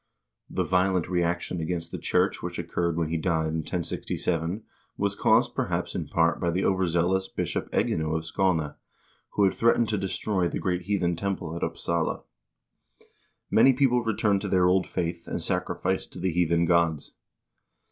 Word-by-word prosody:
The - - -1
violent 90 -1 +1
reaction 90 0 -1
against 85 0 -3
the - - -5
church - - +1
which - - -5
occurred 85 -1 -1
when 80 -2 0
he 85 - 0
died 80 -1 0
in 80 0 -1
10G7, 85 +2 -2 0.3
was 100 0 0
caused, - - +3
perhaps, - - -2
in - - -3
part 85 0 +2
by 85 - 0
the 90 +3 0
overzeal 90 -1 +2
ous 95 0 -1
Bishop - - -3
Egino 80 0 0
of 80 - -5
Skane, 80 -4 0 0.6
who 105 - +2
had 95 - +4
threatened 115 0 +3
to 105 -3 0
destroy 95 -1 -1
the - - -3
great 90 -1 -1
heathen 90 -4 +1
temple 85 -3 -3
at 85 - -5
Upsala. 85 -1 -1 1.3
Many 135 - +6
people 125 -2 +3
returned 105 -3 +1
to - - -3
their 90 -2 +3
old 95 +1 +3
faith, 85 -1 -3
and - - -3
sacrificed 95 0 -2
to - - -8
the 90 +1 0
heathen 85 0 +2
gods. 85 -3 +1
90 Hz, 165 wpm, -27 LUFS, 85-95 Hz, 1.3 s, Many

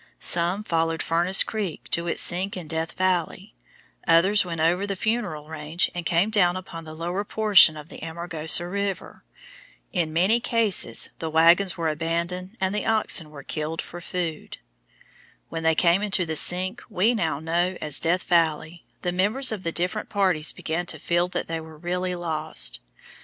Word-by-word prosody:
Some 175 +4 +3
followed 165 -3 -1
Furnace 175 +3 +3
Creek 205 -7 -5
to 170 0 0
its - - 0
sink 185 +3 0
in 175 -4 -7
Death 160 +1 -3
Valley; 185 +1 -1 0.5
others 185 +5 +4
went 170 -3 -5
over 175 +5 +1
the 200 - -2
Funeral 195 -8 -2
range 160 +2 -2
and 175 -2 -4
came 180 +5 +2
down 180 -5 +3
upon 165 -3 -9
the 155 0 -9
lower 175 +5 -3
portion 205 -7 +5
of 150 +1 -10
the - - -11
Amargosa 165 0 0
River. 200 +1 -4 0.7
In 170 -5 0
many 185 +9 +3
cases 230 -4 0
the 160 - -3
wagons 170 +4 +4
were 165 -1 -1
abandoned 170 +5 -3
and 190 0 0
the 210 - -2
oxen 215 -7 +1
were 145 -2 -11
killed 155 +3 -4
for 175 - -7
food. 170 -3 -5 0.9
When 165 - -5
they 160 0 +2
came 175 +3 +3
into 195 -3 0
the 160 -1 -4
sink 185 +8 +2
we 210 +3 +2
now 165 -10 -1
know 175 +3 -1
as 150 -2 0
Death 175 +2 0
Valley, 165 -1 0 0.2
the 180 - 0
members 210 +9 +4
of 215 -3 -4
the 170 - -3
different 180 +6 -2
parties 185 -7 +1
began 170 +2 -4
to 160 - -4
feel 175 +3 0
that 180 - -4
they 165 0 -3
were 160 -1 -12
really 180 +2 -3
lost. 155 - -1
175 Hz, 175 wpm, -24 LUFS, 160-190 Hz, 0.9 s, portion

